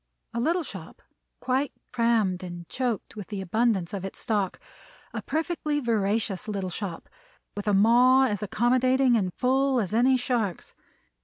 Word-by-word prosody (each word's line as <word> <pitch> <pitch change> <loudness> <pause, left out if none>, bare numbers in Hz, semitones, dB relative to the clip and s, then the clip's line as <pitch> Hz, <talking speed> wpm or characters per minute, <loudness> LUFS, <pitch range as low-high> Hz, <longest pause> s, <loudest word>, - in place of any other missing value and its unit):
A 235 - -2
little 335 +8 +1
shop, - - -10 0.4
quite 260 +2 0 0.2
crammed 225 -6 +1
and 175 -2 -8
choked 245 -5 -3
with 205 -3 -7
the 205 -2 -5
abundance 195 -1 0
of 195 -2 -4
its 195 - -6
stock; 205 -5 -1 0.5
a - - -3
perfectly 315 -2 -1
voracious 220 -5 -1
little 195 -3 -3
shop, 180 -3 -5 0.5
with 205 +1 -5
a 205 - +3
maw 245 +6 +6
as 205 -6 -1
accommodating 250 +4 +2
and 190 -5 0
full 265 +3 +2
as 205 -2 -2
any 255 +3 +4
shark's. 240 -7 -2
230 Hz, 150 wpm, -26 LUFS, 195-255 Hz, 0.5 s, maw